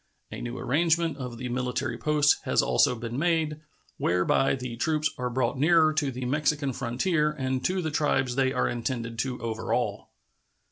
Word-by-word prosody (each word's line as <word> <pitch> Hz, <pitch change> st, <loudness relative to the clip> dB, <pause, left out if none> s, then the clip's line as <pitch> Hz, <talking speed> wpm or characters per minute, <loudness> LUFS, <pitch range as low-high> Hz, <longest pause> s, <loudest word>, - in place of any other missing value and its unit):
A -, -, -6 dB
new 120 Hz, +1 st, -5 dB
arrangement 165 Hz, +2 st, +1 dB
of 125 Hz, -3 st, -6 dB
the 125 Hz, -, -5 dB
military 125 Hz, 0 st, -2 dB
posts 150 Hz, +3 st, +3 dB
has -, -, +2 dB
also 65 Hz, -, +3 dB
been 120 Hz, +2 st, -5 dB
made, 160 Hz, -2 st, 0 dB, 0.4 s
whereby 90 Hz, +10 st, +2 dB
the 125 Hz, -2 st, -6 dB
troops 155 Hz, +3 st, 0 dB
are 125 Hz, 0 st, -1 dB
brought 125 Hz, +1 st, -1 dB
nearer 160 Hz, +1 st, +4 dB
to 150 Hz, -3 st, 0 dB
the 125 Hz, 0 st, -5 dB
Mexican 145 Hz, 0 st, 0 dB
frontier 150 Hz, +6 st, 0 dB
and 130 Hz, -3 st, -2 dB
to 185 Hz, 0 st, 0 dB
the 160 Hz, -, -2 dB
tribes 135 Hz, -4 st, +1 dB
they 130 Hz, 0 st, +2 dB
are -, -, +1 dB
intended 115 Hz, -1 st, -3 dB
to 125 Hz, +1 st, -2 dB
overawe. 110 Hz, -1 st, -2 dB
130 Hz, 170 wpm, -27 LUFS, 120-150 Hz, 0.4 s, nearer